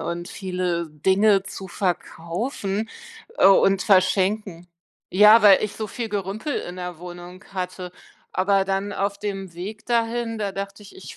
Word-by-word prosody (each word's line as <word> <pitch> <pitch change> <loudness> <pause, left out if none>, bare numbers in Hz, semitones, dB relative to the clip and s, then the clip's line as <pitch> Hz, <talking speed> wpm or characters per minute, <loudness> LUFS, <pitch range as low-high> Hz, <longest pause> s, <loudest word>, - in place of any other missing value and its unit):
und 175 0 -4
viele 180 -3 -2
Dinge 190 +6 +3
zu 195 -1 -8
verkaufen, 195 - -3 0.5
äh, - - +6
und 195 0 +5
verschenken. 190 -1 +2 0.5
Ja, 210 +4 +7
weil 200 -2 +7
ich 210 - -5
so 215 - -3
viel 230 +2 -4
Gerümpel 205 +7 -3
in 180 - -5
der 180 -2 -6
Wohnung 175 +1 -10
hatte. 180 -1 -5 0.4
Aber 195 +1 +2
dann 195 +1 -2
auf 200 0 -2
dem 195 -4 -5
Weg 205 +5 -7
dahin, 230 -1 0
da 205 -2 -2
dachte 200 +1 -6
ich, 200 - -14
ich - - -10
195 Hz, 150 wpm, -23 LUFS, 180-210 Hz, 0.5 s, Ja